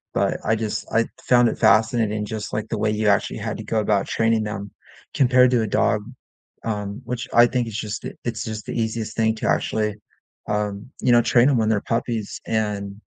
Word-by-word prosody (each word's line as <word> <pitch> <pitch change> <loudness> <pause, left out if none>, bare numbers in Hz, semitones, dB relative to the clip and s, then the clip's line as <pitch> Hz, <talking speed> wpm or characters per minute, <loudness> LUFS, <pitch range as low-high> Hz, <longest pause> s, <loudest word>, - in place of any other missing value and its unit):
But - - +1
I 110 - +3
just 110 -1 -3
I 115 0 +3 0.2
found 120 -1 +5
it - - -4
fascinating 110 0 +3
just 105 0 -5
like 110 +1 -3
the 115 - -2
way 110 - +1
you 105 0 0
actually 100 -1 +1
had - - -4
to - - -7
go 110 - -1
about 100 -1 +1
training 115 -1 +1
them 100 -1 -5 0.4
compared 125 -1 +4
to 125 -2 +3
a 110 - -1
dog, 105 +1 +1 0.6
um, 105 -2 -4
which 125 -1 -4
I 120 +1 +7
think 125 -1 -1
it's 110 -2 -5
just 105 0 -4
the - - -6
it's 115 -3 -3
just 110 -1 -6
the - - -5
easiest 110 -1 -2
thing 110 -1 +2
to 110 - -3
actually, 105 -1 0 0.5
um, 105 +3 -3
you 125 - +3
know, 120 0 +6
train 120 +3 +4
'em 130 - +2
when 110 -1 +1
they're 105 -2 +1
puppies 115 -2 -2
and 105 -2 -2
110 Hz, 210 wpm, -22 LUFS, 105-115 Hz, 0.6 s, I